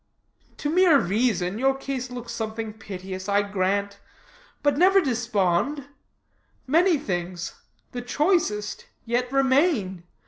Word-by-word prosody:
"To - - -3
mere 350 -3 +6
reason, 200 -1 0
your 270 +1 +2
case 270 -2 -4
looks 245 -1 -7
something 220 -1 -4
piteous, 190 -2 -7
I 200 0 +3
grant. 200 0 -1 0.6
But 290 -1 +3
never 375 +5 +5
despond; 240 - 0 0.8
many 330 +5 +4
things 175 - -4 0.4
the 245 - -5
choicest 245 - 0 0.2
yet 245 +2 -1
remain. 260 - +2
235 Hz, 110 wpm, -25 LUFS, 200-275 Hz, 0.8 s, mere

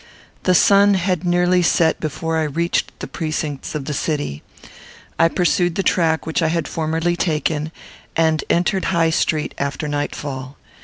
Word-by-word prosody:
The 185 - +4
sun 200 +1 +5
had 180 -1 0
nearly 180 +1 +3
set 165 -1 +2
before 160 +2 -2
I 155 - +1
reached 170 +4 -1
the - - -4
precincts 155 -3 -4
of 145 -3 -3
the 150 - -3
city. 145 - -2 0.8
I 165 - +6
pursued 175 0 +1
the 195 - 0
track 160 -4 +1
which 160 +2 -1
I 165 - +2
had 165 0 -1
formerly 165 +1 -1
taken, 155 -2 -1 0.4
and 160 -1 +2
entered 180 +2 +1
High 165 -2 +2
Street 155 -1 0
after 140 +2 -2
nightfall. 145 -2 -4
160 Hz, 155 wpm, -20 LUFS, 150-175 Hz, 0.8 s, I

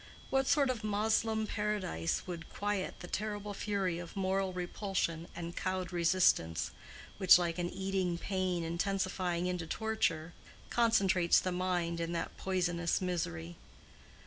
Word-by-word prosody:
What 270 0 +2
sort 280 -3 +4
of 235 -3 -5
Moslem 220 +1 +1
paradise 210 - -1
would 170 -2 -6
quiet 205 -2 -2
the 175 - -7
terrible 210 +1 -3
fury 195 -4 -1
of 170 -1 -8
moral 190 0 0
repulsion 180 -2 -2
and 170 0 -5
cowed 185 -1 -2
resistance 170 - +3 0.5
which, 190 -3 +9
like 170 -1 -1
an 175 0 0
eating 190 -2 -1
pain 185 -2 -1
intensifying 180 0 -1
into 180 -2 -2
torture, 170 -6 -1 0.4
concentrates 195 -7 +4
the 185 - -2
mind 180 -2 0
in 165 0 -2
that 165 - -3
poisonous 175 -2 0
misery? 85 - -3
185 Hz, 130 wpm, -33 LUFS, 170-200 Hz, 0.5 s, which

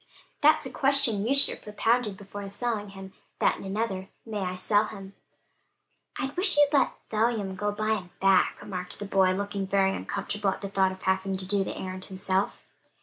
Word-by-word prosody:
"That's 310 +1 +5
a - - -5
question 270 -7 +2
you 270 - +3
should 280 - +4
have - - -22
propounded 215 0 +1
before 200 0 -8
selling 210 -1 -2
him, 195 -1 -10 0.2
that - - +2
and - - -9
another; 195 -2 -2 0.2
'May 215 -2 -4
I 185 -1 -2
sell 205 +3 +2
him.'" 195 -2 -9 1.0
"I 275 -1 -3
wish 365 -3 +2
you'd 290 0 +5
let 280 - +3 0.2
Phelim 215 -3 0
go 205 +2 -3
and 205 0 -2
buy 215 +1 +1
him 180 -3 -9
back," 195 -1 +4
remarked 180 -3 -5
the 205 - -5
boy, 190 -1 +3
looking 200 0 -3
very 195 0 +2
uncomfortable 200 0 -2
at - - -3
the 200 - -4
thought 190 -1 +2
of 190 0 -10
having 190 0 0
to 190 - -6
do 195 +1 +1
the - - -5
errand 185 0 -5
himself. 190 +1 -1
200 Hz, 200 wpm, -27 LUFS, 190-220 Hz, 1.0 s, That's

